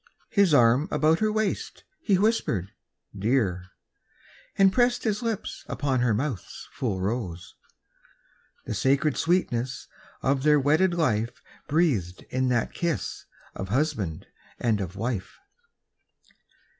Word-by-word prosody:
His 200 -5 +4
arm 125 +2 +5
about 160 -3 +2
her 215 0 +2
waist, 215 -1 -2 0.2
he 200 - +2
whispered 180 - 0 0.4
"Dear," 100 -4 0 0.9
And 195 -1 +5
pressed 245 0 +2
his 215 0 0
lips 230 -4 -3
upon 135 -3 -1
her 120 -1 +2
mouth's 125 - -4
full 105 -7 -2
rose— 95 -4 -3 1.1
The - - -3
sacred 140 +2 +2
sweetness 130 -8 0 0.4
of 135 0 +2
their 150 +1 +5
wedded 155 +6 +3
life 115 -9 0 0.2
Breathed 135 - 0
in 130 0 +1
that 120 -2 0
kiss 170 -3 -3 0.3
of 95 - -6
husband 110 - -1 0.3
and 110 -4 +1
of 90 -1 -5
wife. 110 -2 -3
130 Hz, 120 wpm, -26 LUFS, 110-170 Hz, 1.1 s, arm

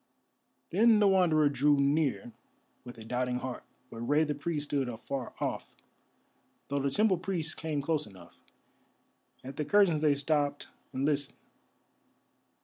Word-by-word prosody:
Then 220 +4 +5
the 210 -1 +4
Wanderer 175 -6 +4
drew 145 +1 +3
near 145 - +1 0.5
with 120 -2 -10
a 110 - -10
doubting 125 +1 -1
heart, 125 0 -6 0.3
but 115 - -8
Rei 145 +7 +2
the 150 -1 -1
Priest 145 +1 -3
stood 135 -3 0
afar 120 +3 -6
off, - - -4 0.9
though 140 0 0
the 140 0 0
temple 195 +4 +2
priests 175 -4 -2
came 155 -3 -3
close 155 -2 -1
enough. 95 -4 -16 1.0
At 135 +1 -9
the 150 - -1
curtains 195 -6 +3
they 150 -2 +3
stopped 145 0 -1 0.2
and 135 +2 -2
listened. 145 -1 -1
145 Hz, 140 wpm, -30 LUFS, 135-160 Hz, 1.0 s, Then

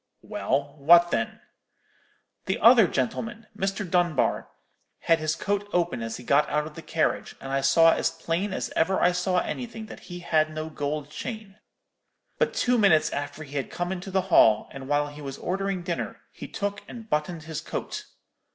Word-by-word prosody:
"'Well, 140 +2 -2
what 170 +4 +6
then?' 115 0 -2 1.0
"'The 190 - 0
other 230 -2 +7
gentleman, 210 - -3
Mr. 195 0 -2
Dunbar, 175 -5 +1 0.5
had 165 -1 +3
his 155 0 0
coat 205 +3 -2
open 175 -8 0
as 115 0 -4
he 125 - -11
got 140 +4 +3
out 150 0 0
of 155 - -9
the - - -9
carriage, - - -1
and 135 - -7
I 135 0 +1
saw 165 +5 +6
as - - +1
plain 165 +4 -2
as - - -3
ever 185 +4 +2
I 180 - +4
saw 180 +1 0
anything, 230 -3 -5
that - - -10
he 175 0 -7
had 155 -2 +2
no 155 0 -5
gold 145 0 -3
chain. 215 +1 -7 0.8
But - - +1
two 245 -1 +2
minutes 180 -7 +4
after 145 +2 -4
he 145 -1 -7
had 135 - -2
come 175 +1 -3
into 190 +1 -5
the 190 0 +1
hall, 110 -1 +6
and 135 -1 -8
while 145 +1 +2
he 145 +1 -11
was 135 -2 -6
ordering 195 0 -2
dinner, 170 -1 -4
he - - -9
took 205 0 -3
and 230 -2 -9
bottoned 155 -1 -2
his 155 -1 -5
coat. - - -5
165 Hz, 185 wpm, -26 LUFS, 145-195 Hz, 1.0 s, other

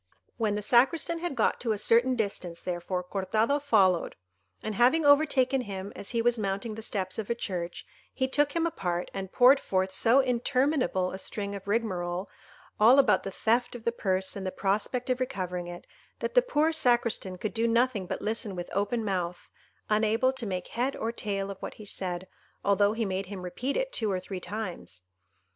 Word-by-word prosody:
When 215 -3 0
the 210 - -3
Sacristan 270 +9 +3
had 345 -4 -3
got - - +1
to 230 -3 0
a - - -3
certain 235 +5 +3
distance, 190 -6 -3
therefore, 180 +1 -3
Cortado 215 +9 0
followed, 195 -11 +3 0.5
and 215 - -3
having 255 +9 +4
overtaken 280 -3 +4
him 195 -3 -6
as 200 - -5
he 230 -1 0
was 240 -1 +3
mounting 200 +2 -2
the 220 - -7
steps 195 -2 -3
of 215 - -4
a 235 - +1
church, 180 -6 -4 0.3
he 260 - -1
took 285 +2 +1
him 335 0 +1
apart, 180 - -2
and 190 -1 -5
poured 260 +3 +6
forth 190 -4 -1
so 230 +7 +4
interminable 255 -5 +1
a 190 - -6
string 200 0 -4
of 200 0 -8
rigmarole, 185 -4 -1 0.5
all 230 +5 +7
about 265 -6 +5
the - - -5
theft 235 +5 0
of 235 - -8
the 235 - +1
purse, 190 -4 -1
and 200 - -5
the 185 - -2
prospect 210 +7 -1
of 255 - 0
recovering 180 -9 -3
it, 175 0 -8 0.3
that 475 - -3
the - - +6
poor 325 -10 +1
Sacristan 240 -9 +1
could 210 +3 -4
do 230 0 +1
nothing 230 -4 +1
but - - -4
listen 215 -2 -2
with 175 -1 -6
open 215 +3 0
mouth, 180 -3 -3 0.4
unable 220 +4 +2
to 255 -4 -4
make 185 -2 -4
head 255 +4 -1
or 225 - -2
tail 200 -3 -3
of 195 - -9
what - - -7
he 215 - -11
said, 185 -2 -3 0.4
although 200 +1 +3
he 225 0 -1
made 190 -1 -2
him 190 -2 -7
repeat 245 +10 -3
it - - -2
two 220 -3 0
or 185 - 0
three 185 0 -6
times. 180 - -6
215 Hz, 195 wpm, -28 LUFS, 190-250 Hz, 0.5 s, all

